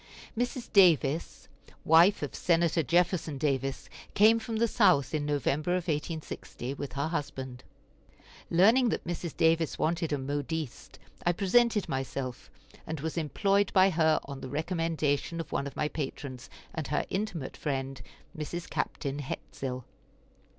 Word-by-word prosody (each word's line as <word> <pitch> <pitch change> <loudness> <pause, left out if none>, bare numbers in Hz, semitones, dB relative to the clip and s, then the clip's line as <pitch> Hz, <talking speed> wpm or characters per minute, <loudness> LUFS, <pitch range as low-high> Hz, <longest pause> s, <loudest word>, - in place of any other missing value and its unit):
Mrs. 245 +1 -3
Davis, 165 -6 +3 0.4
wife 170 +4 +6
of 145 - -4
Senator 170 -1 +2
Jefferson 170 -1 +1
Davis, 135 -1 -1 0.3
came 220 +3 +6
from 225 0 -5
the 230 +1 +2
South 155 - +3
in 150 -1 -1
November 150 +3 0
of 180 -1 0
1860, 150 -4 -4
with 140 -2 -6
her 140 +3 -1
husband. 130 -5 -4 0.9
Learning 225 +9 +5
that - - -2
Mrs. 170 -1 -4
Davis 165 -1 +2
wanted 165 0 0
a 145 - +1
modiste, 145 +1 -4 0.3
I 175 - +3
presented 210 +3 +3
myself, 135 -1 -4 0.4
and 160 -1 -4
was 160 +2 -3
employed 195 +5 +1
by 190 0 +6
her 160 -2 +3
on 140 -1 -7
the 130 - -6
recommendation 165 0 -1
of 165 - -5
one 140 - -1
of 140 - -9
my 150 - 0
patrons 135 -4 -6 0.2
and 160 -4 -4
her 150 - 0
intimate 185 -8 -3
friend, 135 -2 -3 0.3
Mrs. 165 +2 -5
Captain 140 -1 -3
Hetsill. 130 -2 -5
160 Hz, 140 wpm, -29 LUFS, 140-175 Hz, 0.9 s, wife